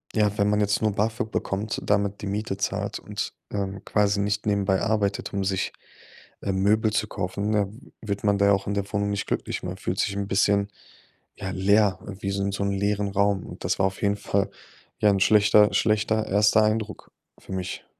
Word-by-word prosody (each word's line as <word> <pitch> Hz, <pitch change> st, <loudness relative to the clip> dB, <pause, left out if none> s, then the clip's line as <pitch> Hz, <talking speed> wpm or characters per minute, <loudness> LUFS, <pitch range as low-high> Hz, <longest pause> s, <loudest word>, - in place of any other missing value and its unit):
ja, 105 Hz, -1 st, +2 dB
wenn 100 Hz, 0 st, +2 dB
man 105 Hz, 0 st, +2 dB
jetzt 105 Hz, +1 st, +1 dB
nur 110 Hz, -2 st, +1 dB
BAföG 110 Hz, +1 st, -1 dB
bekommt, 100 Hz, +3 st, -2 dB
damit 100 Hz, -1 st, 0 dB
die 100 Hz, -, -4 dB
Miete 100 Hz, 0 st, -2 dB
zahlt 100 Hz, -, -2 dB
und, -, -, -5 dB, 0.2 s
ähm, 95 Hz, -1 st, -3 dB
quasi 100 Hz, -1 st, +2 dB
nicht 105 Hz, +1 st, -1 dB
nebenbei 100 Hz, -2 st, +1 dB
arbeitet, 105 Hz, -2 st, 0 dB
um 100 Hz, -1 st, -1 dB
sich, 95 Hz, -1 st, -1 dB, 0.7 s
ähm, 95 Hz, -1 st, -1 dB
Möbel 110 Hz, +1 st, +3 dB
zu 110 Hz, 0 st, 0 dB
kaufen, 100 Hz, +2 st, -3 dB
dann 105 Hz, +4 st, -2 dB
wird 100 Hz, -2 st, -4 dB
man 100 Hz, -1 st, +3 dB
da 100 Hz, -, +3 dB
ja 100 Hz, -, +5 dB
auch 95 Hz, 0 st, -1 dB
in 100 Hz, -, -1 dB
der 100 Hz, -1 st, -2 dB
Wohnung 100 Hz, 0 st, 0 dB
nicht 100 Hz, -1 st, -2 dB
glücklich. -, -, -2 dB
Man 90 Hz, +1 st, -5 dB
fühlt 95 Hz, 0 st, -3 dB
sich 100 Hz, -1 st, 0 dB
'n 100 Hz, 0 st, -2 dB
bisschen, 100 Hz, 0 st, +2 dB, 0.7 s
ja, 95 Hz, -, -5 dB
leer 100 Hz, +1 st, +3 dB, 0.2 s
wie 100 Hz, -, -2 dB
so 100 Hz, 0 st, -1 dB
'n 100 Hz, -, 0 dB
so 100 Hz, -, -2 dB
'n 100 Hz, -, 0 dB
leeren 100 Hz, +1 st, 0 dB
Raum. 100 Hz, -1 st, +1 dB
Und -, -, -10 dB
das -, -, +1 dB
war 95 Hz, -, +4 dB
auf 95 Hz, -, -7 dB
jeden 100 Hz, 0 st, +2 dB
Fall 100 Hz, -1 st, 0 dB, 0.5 s
ja 105 Hz, -, +4 dB
ein 100 Hz, -, +1 dB
schlechter 105 Hz, 0 st, +5 dB
schlechter 110 Hz, 0 st, +2 dB
1. 105 Hz, +2 st, +4 dB
Eindruck 110 Hz, 0 st, -2 dB, 0.3 s
für -, -, -13 dB
mich. 95 Hz, 0 st, -4 dB
100 Hz, 205 wpm, -25 LUFS, 100-105 Hz, 0.7 s, ja